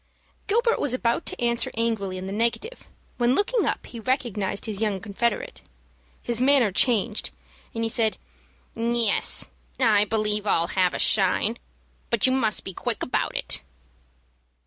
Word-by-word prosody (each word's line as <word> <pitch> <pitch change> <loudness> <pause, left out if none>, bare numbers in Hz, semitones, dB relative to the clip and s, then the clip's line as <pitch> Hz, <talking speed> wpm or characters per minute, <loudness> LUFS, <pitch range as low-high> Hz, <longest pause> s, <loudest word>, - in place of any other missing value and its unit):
Gilbert 465 +3 +2
was 255 -3 +1
about 235 -2 -1
to - - -3
answer 235 -1 +1
angrily 220 -5 -1
in 185 - -6
the 190 - -5
negative, 235 - -2 0.3
when 240 +2 +3
looking 440 +3 +1
up - - -2
he 235 - -9
recognized 225 -6 -1
his 215 -2 -3
young 210 -3 0
confederate. 210 +3 -3 0.6
His 240 0 -1
manner 260 -5 +4
changed, 220 +1 +1 0.5
and 230 - -2
he - - +1
said, 225 -2 +1 0.6
"Yes, 230 -1 +3 0.3
I 215 -5 +4
believe 210 -1 +1
I'll 170 -2 +1
have 185 -2 +1
a - - -1
shine; 205 +3 +2 0.5
but 235 -3 +1
you 260 - +3
must 230 -5 0
be 190 - -6
quick - - -2
about - - -2
it." - - -2
225 Hz, 150 wpm, -24 LUFS, 205-240 Hz, 0.6 s, manner